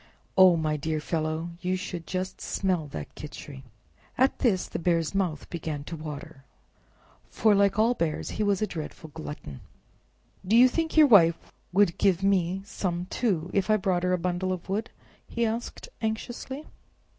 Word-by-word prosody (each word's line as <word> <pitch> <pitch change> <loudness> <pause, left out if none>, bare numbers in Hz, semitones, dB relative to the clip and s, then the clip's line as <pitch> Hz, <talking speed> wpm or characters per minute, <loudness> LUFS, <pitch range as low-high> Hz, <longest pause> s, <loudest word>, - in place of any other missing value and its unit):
Oh, 185 -2 +8
my 155 -2 0
dear 155 +1 -2
fellow, 155 +2 -2
you 185 0 0
should 180 -3 -5
just 185 0 -4
smell 180 -5 -1
that 145 - -7
Khichri." 145 -2 -9 0.6
At 260 +1 +3
this 200 -8 +2
the - - -4
Bear's 165 -1 +1
mouth 180 -6 -1
began 155 -4 -4
to 165 - -6
water, 150 -3 -8 0.9
for, 215 -2 +3
like 200 0 +3
all 225 +3 +4
bears, 165 -9 -2
he - - -3
was 205 0 +1
a - - +3
dreadful 160 -3 -7
glutton. 145 - -7 0.8
"Do 200 +4 +2
you 250 +2 +9
think 320 +5 -2
your 310 - +9
Wife 170 - +5 0.2
would 185 -2 +3
give 190 -1 +3
mite 195 -1 +1
some, 180 -3 -3
too, 185 -8 0
if 195 +1 +1
I 215 - +5
brought 190 -3 0
her 180 0 +1
a 180 - +3
bundle 180 +2 -1
of 185 -1 -4
wood?" 205 +4 -2 0.4
he 235 0 -1
asked 230 - -4
anxiously. 240 +6 -4
185 Hz, 170 wpm, -27 LUFS, 160-205 Hz, 0.9 s, you